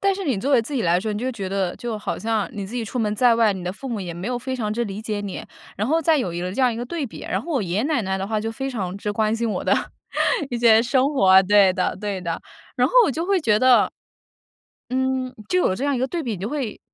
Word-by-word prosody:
但 395 -1 +2
是 390 - -5
你 270 - 0
作 275 +8 -1
为 255 - +6
自 285 +6 -6
己 245 - 0
来 175 +1 +2
说， 215 +2 -2
你 205 - -3
就 255 +2 -2
觉 195 -5 -5
得 190 -2 -1
就 230 -3 -4
好 - - -4
像 220 -2 -1
你 200 -2 -5
自 215 - -9
己 240 -2 -2
出 245 +4 -5
门 210 -2 0
在 240 0 +5
外， 225 -3 +4
你 180 -1 -7
的 180 - -2
父 265 +7 -8
母 230 -4 -3
也 175 -3 -5
没 175 +7 -5
有 245 - -1
非 260 +1 -4
常 215 -4 -2
之 235 +2 -1
理 200 0 -5
解 215 -2 -3
你， 200 -2 -5 0.3
然 210 +4 -1
后 320 +3 +3
再 315 -1 +3
有 180 -9 -2
一 175 - -4
个 180 +1 -3
这 235 - -2
样 250 -2 +4
一 225 - -5
个 240 - -3
对 300 +1 -3
比。 - - -10
然 - - -2
后 340 - -6
我 260 -7 +1
爷 180 0 -2
爷 215 - +1
奶 295 -5 +1
奶 190 -1 -2
的 195 - -3
话 215 0 -1
就 225 +1 -3
非 270 +4 -4
常 190 -7 -3
之 210 - -3
关 215 +1 +1
心 230 0 -1
我 - - -3
的 - - +2 0.8
一 240 - -2
些 230 -1 +6
生 260 +4 +2
活。 190 -6 +6
对 200 -1 +5
的 185 -1 -1
对 200 -3 -3
的。 170 -2 -3 0.4
然 - - +3
后 - - -9
我 - - +1
就 320 +5 -2
会 390 -2 +2
觉 215 -7 +3
得 255 +1 +5 1.0
嗯， 260 0 -1
就 365 - +2
有 185 - +2
这 250 - -6
样 285 -2 +1
一 - - -2
个 260 - +1
对 340 +3 -3
比， 235 -7 -3
你 185 - -6
会 250 -1 -3
225 Hz, 325 characters per minute, -22 LUFS, 200-260 Hz, 1.0 s, 为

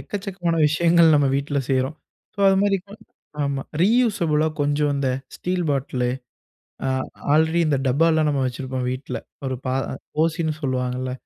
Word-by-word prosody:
எக்கச்சக்கமான 190 -4 -3
விஷயங்கள் 165 +1 +4
நம்ம 145 -2 +3
வீட்ல 140 +1 -1
செய்றோம். 135 +3 0 0.4
ஸோ 200 - -4
அதுமாரி 195 +1 +3
ப 200 - -20 0.5
ஆமா. 140 -1 -2 0.2
ரீயூசபுளா 190 -8 +3
கொஞ்சம் 145 0 +1
இந்த 140 -1 0 0.3
ஸ்டீல் 180 -1 -2
பாட்டிலு. 130 -3 -1 0.8
அ - - 0 0.5
ஆல்ரெடி 160 +2 +3
இந்த 145 -2 +2
டப்பாலாம் 155 +3 +3
நம்ம 140 -2 0
வச்சிருப்போம் 130 0 -4
வீட்ல. 130 +2 -5 0.3
ஒரு 130 - -2
பா 130 - 0 0.5
ஓசின்னு 165 -1 0
சொல்லுவாங்கல்ல. 130 -1 -2
150 Hz, 135 wpm, -23 LUFS, 135-170 Hz, 0.8 s, விஷயங்கள்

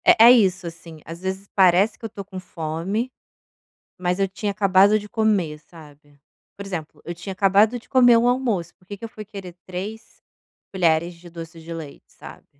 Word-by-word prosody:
É - - +7
é - - +10
isso, 195 -6 +3
assim. 165 -1 -10
Às 165 +1 -9
vezes 190 +1 -4
parece 190 +2 +4
que - - -10
eu - - -4
tô 200 -2 -8
com 190 -1 -8
fome, 180 +8 -3 0.9
mas 180 0 -1
eu 195 0 +1
tinha 205 +2 -3
acabado 195 +1 +4
de 210 0 -10
comer, 205 -9 0
sabe. 150 -3 -17 0.4
Por 200 - -7
exemplo, 170 -6 -6
eu 170 - -5
tinha 175 +3 -7
acabado 200 +5 +3
de 235 - -19
comer 245 -3 +6
o 230 +1 +3
almoço, 235 -9 -1
por 180 - -29
que 205 - -7
que 200 - -10
eu - - -5
fui 215 -1 -10
querer 195 -4 -9
3 205 +5 -7 0.5
colheres 170 -2 +1
de 170 +1 -15
doce 165 0 -9
de 165 +1 -9
leite, 160 -4 -9
sabe? - - -13
190 Hz, 195 wpm, -23 LUFS, 170-210 Hz, 0.9 s, é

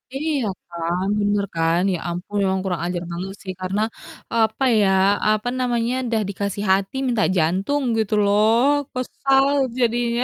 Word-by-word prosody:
Iya 290 -2 -1 0.3
kan, 170 +2 -2
bener 205 0 +1
kan. 165 +1 +2
Ya - - -1
ampun 180 +4 -5
memang 190 0 +1
kurang 180 -3 -2
ajar 175 0 -3
banget 190 +3 -5
sih, 190 -1 -5
karena 195 +3 -1 0.5
apa 220 +3 +1 0.2
ya, 200 -2 +3 0.4
apa 215 +2 +1
namanya, 240 -1 0
udah 225 -2 0
dikasih 200 +1 -3
hati 195 +5 +1
minta 235 -4 +1
jantung 190 - +1 0.2
gitu 215 -1 -1
loh. 210 +2 +3 0.4
Kesal 270 +2 +1 0.3
jadinya. 240 0 +1
205 Hz, 145 wpm, -22 LUFS, 185-235 Hz, 0.5 s, ya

